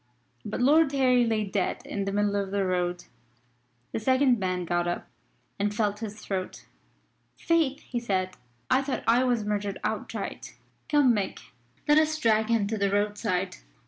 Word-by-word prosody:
But 215 - -4
Lord 300 +2 +5
Harry 250 -3 +3
lay 220 -1 +1
dead 195 - -2
in 200 -1 -3
the 195 - -2
middle 205 0 +1
of 200 -1 -1
the 200 0 0
road. 180 -1 -1 0.9
The - - -2
second 260 +1 +3
man 185 -2 -1
got 175 +1 0
up 175 - -3 0.5
and 205 +1 0
felt 210 -2 0
at 220 - -3
his 210 +1 -13
throat. 185 -2 -4 0.7
"Faith!" 310 -4 +1
he 245 - -4
said, 185 -5 -1 0.3
"I 260 - +3
thought 275 -1 -3
I 240 +2 +4
was 240 -4 +1
murdered 205 -1 -2
outright. - - -4 0.3
Come, 285 -5 +5
Mick, 195 - -4 0.4
let 295 +1 +6
us 310 0 +1
drag 220 -5 +2
him 230 -3 +2
to 215 +1 -3
the 200 0 +2
roadside." 205 -2 -1
210 Hz, 170 wpm, -27 LUFS, 195-250 Hz, 0.9 s, let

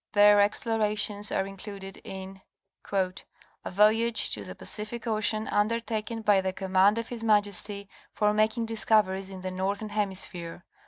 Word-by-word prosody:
Their 205 0 +6
explorations 210 -1 +1
are 190 - 0
included 195 0 -9
in 190 0 -8 0.5
"A 185 -2 -1 0.5
voyage 220 +3 +3
to 105 - -1
the 90 -2 -9
Pacific 215 +3 -5
Ocean, 215 -1 0
undertaken 225 +1 -1
by 205 -2 +4
the 190 0 -2
command 190 +3 +3
of 230 0 -4
his 235 -2 -5
Majesty, 205 -1 +1 0.2
for 210 0 +1
making 220 +2 +1
discoveries 210 -4 +1
in 190 -1 -9
the 185 0 -4
northern 200 +3 -3
hemis 205 -3 -1
phere, 170 -3 -7
[etc. 175 - -19
205 Hz, 150 wpm, -27 LUFS, 190-215 Hz, 0.5 s, Their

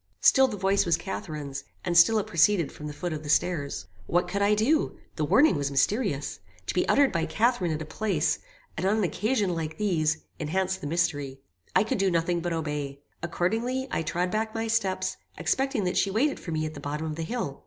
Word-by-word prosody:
Still 265 -1 +6
the 215 -5 -5
voice 195 +1 +2
was 170 -2 +2
Catharine's, 150 -7 -5 0.2
and 175 -1 0
still 175 +6 +7
it 210 - 0
proceeded 170 0 +3
from 150 - -8
the - - -4
foot 175 +3 -4
of 150 - -4
the 150 - -8
stairs. 145 - 0 0.2
"What 175 +1 +2
could 200 +3 -2
I 205 +1 +4
do? 275 +9 +1 0.2
The - - -1
warning 285 - +5
was 140 -1 -1
mysterious. 145 - 0 0.3
To - - -2
be - - +1
uttered 280 -1 +5
by 165 -1 0
Catharine 225 -5 +1
at 155 0 -2
a - - -9
place, 175 -1 0 0.4
and 180 +4 -1
on 210 +3 +2
an 215 - +1
occasion 205 - 0
like 160 -2 -4
these, 160 -7 +1 0.2
enhanced 185 +4 -1
the 145 - -4
mystery. 145 -5 -1 0.3
I - - +6
could 225 +1 -2
do 195 0 +3
nothing 170 0 +1
but 175 +1 -2
obey. 145 -3 -3 0.2
Accordingly, 225 +10 -1
I - - 0
trod 175 +3 -1
back 220 +1 -1
my 225 0 -1
steps, 220 -4 0 0.2
expecting 265 -5 0
that 180 0 -1
she 200 - +3
waited 250 +9 +1
for - - -9
me 155 -1 -1
at 155 - -4
the 145 - -8
bottom 145 +2 -4
of 155 -1 -3
the 165 - -4
hill. 160 - -3
175 Hz, 215 wpm, -27 LUFS, 155-210 Hz, 0.4 s, still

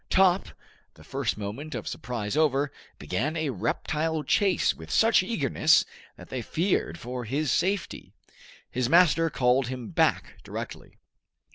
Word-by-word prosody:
Top, 190 0 +4 0.5
the 75 - -16
first 135 - -2
moment 110 +10 -6
of - - -5
surprise 115 -2 -4
over, 145 -2 +2 0.3
began 115 - -2
a 155 -3 -1
reptile 155 - -1
chase 190 +6 +2
with 80 0 -12
such 225 - +4
eagerness, 185 - +2 0.3
that - - -13
they 130 - -3
feared 160 - -1
for 125 +4 -5
his 140 +6 -1
safety. 190 0 -1 0.6
His 125 -1 -1
master 165 0 +5
called 125 -2 +2
him 125 -2 -6
back - - 0
directly. - - -8
140 Hz, 135 wpm, -27 LUFS, 120-165 Hz, 0.6 s, master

